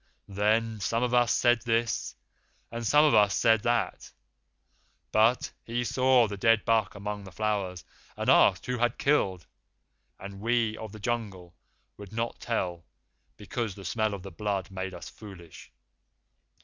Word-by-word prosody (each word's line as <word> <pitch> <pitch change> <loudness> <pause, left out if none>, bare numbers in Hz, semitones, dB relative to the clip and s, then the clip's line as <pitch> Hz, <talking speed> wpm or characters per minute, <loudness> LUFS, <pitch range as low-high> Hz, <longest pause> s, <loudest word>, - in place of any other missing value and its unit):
Then 110 +2 +1
some 115 +5 -1
of 125 0 -1
us 120 -2 +4
said 120 -1 +3
this 115 0 -1 0.6
and 115 -1 -4
some 150 +5 +5
of 150 - +3
us 105 -3 +4
said 110 -2 +3
that, 115 -5 -1 1.0
but 115 +3 +3
he 120 +1 -2
saw 130 -1 +3
the 100 -1 -6
dead 115 +2 +3
buck 110 -3 +1
among 100 0 -5
the 95 - -11
flowers, 95 -2 -2 0.3
and - - -4
asked - - +5
who 125 -1 -2
had 120 +1 +1
killed, 95 - +1 0.7
and 100 0 -9
we 115 0 0
of 110 -1 -8
the 110 - -11
Jungle 100 -6 -4 0.4
would 100 0 -11
not 115 +1 -3
tell 90 -8 -3 0.5
because 105 0 -4
the 100 - -11
smell 110 +2 -1
of 95 - -10
the 95 - -8
blood 100 +1 -3
made 95 0 -5
us 85 - -9
foolish. 95 -6 -12
110 Hz, 155 wpm, -28 LUFS, 100-115 Hz, 1.0 s, some